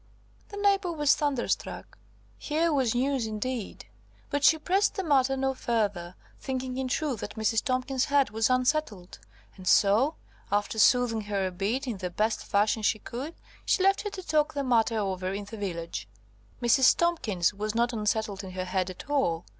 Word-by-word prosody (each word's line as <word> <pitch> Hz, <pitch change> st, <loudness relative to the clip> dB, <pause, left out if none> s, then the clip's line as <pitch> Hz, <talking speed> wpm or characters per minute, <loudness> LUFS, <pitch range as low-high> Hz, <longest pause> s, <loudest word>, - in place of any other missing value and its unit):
The 405 Hz, -, -8 dB
neighbour 400 Hz, -3 st, +2 dB
was 295 Hz, -3 st, +3 dB
thunderstruck. 285 Hz, -5 st, -2 dB, 0.4 s
Here 320 Hz, +2 st, 0 dB
was 255 Hz, -5 st, +1 dB
news 260 Hz, -2 st, 0 dB
indeed. 220 Hz, +1 st, -4 dB, 0.5 s
But 285 Hz, 0 st, -1 dB
she 320 Hz, -, +6 dB
pressed 380 Hz, +6 st, +1 dB
the 385 Hz, -, -2 dB
matter 270 Hz, -4 st, +2 dB
no 265 Hz, 0 st, 0 dB
further, 205 Hz, -8 st, -2 dB, 0.2 s
thinking 260 Hz, -1 st, -4 dB
in 265 Hz, -1 st, -2 dB
truth 265 Hz, -2 st, -1 dB
that 205 Hz, -, -6 dB
Mrs. 220 Hz, 0 st, +1 dB
Tomkins's 255 Hz, 0 st, 0 dB
head 280 Hz, -5 st, +2 dB
was 220 Hz, +2 st, +1 dB
unsettled, 255 Hz, -, 0 dB, 0.4 s
and 185 Hz, -1 st, -10 dB
so, 220 Hz, -, +4 dB, 0.4 s
after 205 Hz, +2 st, 0 dB
soothing 240 Hz, -1 st, +4 dB
her 200 Hz, -2 st, -1 dB
a 185 Hz, -, -2 dB
bit 205 Hz, +10 st, -2 dB
in 240 Hz, -6 st, -4 dB
the 185 Hz, -1 st, -4 dB
best 215 Hz, +5 st, -1 dB
fashion 205 Hz, +2 st, +1 dB
she 215 Hz, +1 st, +2 dB
could, 260 Hz, +9 st, -7 dB, 0.3 s
she 375 Hz, -, +2 dB
left 390 Hz, +1 st, +3 dB
her 415 Hz, -, -4 dB
to 380 Hz, -2 st, -8 dB
talk 310 Hz, -2 st, +1 dB
the 280 Hz, -, -1 dB
matter 230 Hz, -3 st, +2 dB
over 190 Hz, -3 st, -2 dB
in 200 Hz, +1 st, -5 dB
the 220 Hz, +2 st, -9 dB
village. 170 Hz, -, -5 dB, 0.6 s
Mrs. 245 Hz, +2 st, +5 dB
Tomkins 220 Hz, -, +1 dB
was 210 Hz, +2 st, -4 dB
not 240 Hz, +1 st, +1 dB
unsettled 210 Hz, -2 st, -1 dB
in 185 Hz, -1 st, -8 dB
her 185 Hz, 0 st, -3 dB
head 185 Hz, 0 st, -1 dB
at 185 Hz, -, -9 dB
all. 265 Hz, -, 0 dB
235 Hz, 180 wpm, -28 LUFS, 205-280 Hz, 0.6 s, she